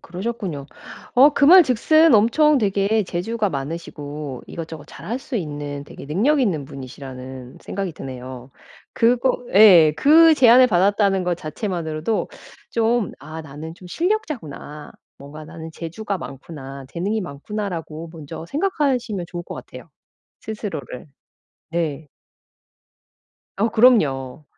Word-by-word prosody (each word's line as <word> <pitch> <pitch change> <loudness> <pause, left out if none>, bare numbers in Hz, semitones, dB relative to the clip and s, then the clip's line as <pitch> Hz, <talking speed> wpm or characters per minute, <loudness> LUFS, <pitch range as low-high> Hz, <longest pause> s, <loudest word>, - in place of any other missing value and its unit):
그러셨군요. 180 -6 -5 0.5
어 270 +4 +7
그 285 - +3
말 365 +3 +9
즉슨 310 +4 +4
엄청 285 +8 +4
되게 205 0 +1
재주가 205 +4 -2
많으시고 145 -2 -6
이것저것 160 -3 -8
잘 170 - -12
할 235 +5 -2
수 265 -1 -5
있는 145 -5 -5
되게 - - -11
능력있는 200 - +1
분이시라는 130 -1 -9
생각이 195 -4 -4
드네요. 130 -2 -9 0.4
그거 245 +2 +2
예. 185 -7 +8
그 320 - +7
제안을 255 -1 +7
받았다는 195 -1 +2
것 175 -1 0
자체만으로도 165 +2 -3 0.4
좀 230 -2 +1
'아 155 +3 -8
나는 155 +2 -9
좀 180 0 -14
실력자구나. 250 - -3 0.3
뭔가 145 +2 -10
나는 160 +1 -9
재주가 190 +5 -5
많구나. 135 -1 -9
재능이 205 +6 -1
많구나.'라고 165 -1 -6
먼저 160 0 -8
생각하시면 270 - -1
좋을 175 -1 -6
것 - - -8
같아요, - - -11 0.5
스스로를. 195 - -6 0.7
네. 160 -3 -2 1.5
어 220 +4 +1
그럼요. 155 - +3
175 Hz, 280 characters per minute, -21 LUFS, 150-230 Hz, 1.5 s, 말